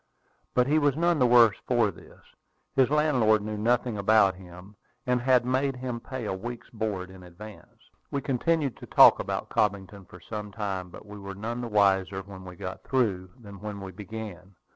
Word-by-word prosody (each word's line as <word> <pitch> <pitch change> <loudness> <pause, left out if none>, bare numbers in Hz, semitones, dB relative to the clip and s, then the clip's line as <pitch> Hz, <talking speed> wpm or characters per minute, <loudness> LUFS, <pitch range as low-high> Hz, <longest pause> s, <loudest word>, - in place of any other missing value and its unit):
But 125 - +4
he 150 +4 +3
was 145 -2 +1
none 170 -1 +2
the 125 - +4
worse 120 -3 +6
for - - +2
this. - - -17 0.5
His 130 -2 +4
landlord 130 -8 +3
knew 105 0 -4
nothing 115 0 0
about 100 -1 +4
him, 90 +2 -13 0.3
and 125 -1 +1
had 125 -1 +3
made 130 +2 0
him 125 -2 -5
pay 130 0 -6
a 105 - -2
week's 120 +5 -7
board 100 -5 -4
in 95 0 -13
advance. 95 +4 -14 0.2
We 140 - -2
continued 140 +1 0
to - - -11
talk - - +7
about - - -4
Cobbington 100 -1 -1
for 90 - -13
some 105 +3 -7
time; 100 -4 -4
but 90 - -12
we 105 0 -10
were 100 0 -8
none 115 +4 -4
the 120 - -4
wiser 95 -2 +2
when 95 -1 -11
we 90 -1 -9
got 90 +2 -7
through 100 -9 0
than 100 -4 -12
when 105 0 -6
we 95 -1 -7
began. 100 -2 -9
105 Hz, 190 wpm, -27 LUFS, 95-125 Hz, 0.5 s, talk